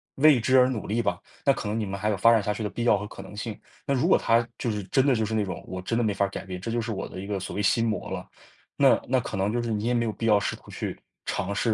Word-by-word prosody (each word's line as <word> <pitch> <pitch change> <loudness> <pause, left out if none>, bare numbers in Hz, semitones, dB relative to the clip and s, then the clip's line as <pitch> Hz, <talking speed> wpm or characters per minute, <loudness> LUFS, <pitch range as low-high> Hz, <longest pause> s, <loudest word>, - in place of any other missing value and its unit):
为 150 0 +6
之 130 +3 +4
而 125 - +6
努 125 -5 -3
力 110 +3 0
吧， - - 0 0.3
那 140 - +6
可 130 - -6
能 110 +2 -1
你 110 - -1
们 100 0 -4
还 105 +2 -1
有 105 - 0
发 115 +6 +6
展 110 -3 +3
下 105 - 0
去 105 - -6
的 105 - -1
必 115 +5 -4
要 115 -3 +4
和 105 +1 -5
可 - - -10
能 - - -11
性。 105 0 -4 0.3
那 140 - +1
如 130 - +1
果 - - +5
他 115 +1 +3
就 120 - -2
是 105 -2 -2
真 130 +8 +2
的 135 -3 +4
就 110 - 0
是 110 - -4
那 110 -2 +1
种 90 -3 -6
我 95 0 -6
真 115 +5 -1
的 120 - +2
没 105 -2 +1
法 100 0 +1
儿 - - -4
改 - - -6
变， 90 -1 -6
这 100 - -5
就 120 +1 0
是 115 0 -4
我 95 -2 -4
的 - - -8
一 - - -6
个 100 -1 -2
所 95 - -6
谓 105 - -1
心 115 +3 +3
魔 110 - -3
了， - - -5 0.5
那 - - +5
那 - - +2
可 - - -5
能 95 +2 +1
就 120 - 0
是 115 - -2
你 105 0 -1
也 120 - +1
没 120 -1 +2
有 115 - -1
必 115 - -5
要 105 -2 +5
试 100 - -1
图 - - -18
去 - - -5 0.3
尝 100 +2 -2
试， 115 +2 +1
110 Hz, 375 characters per minute, -26 LUFS, 100-120 Hz, 0.5 s, 为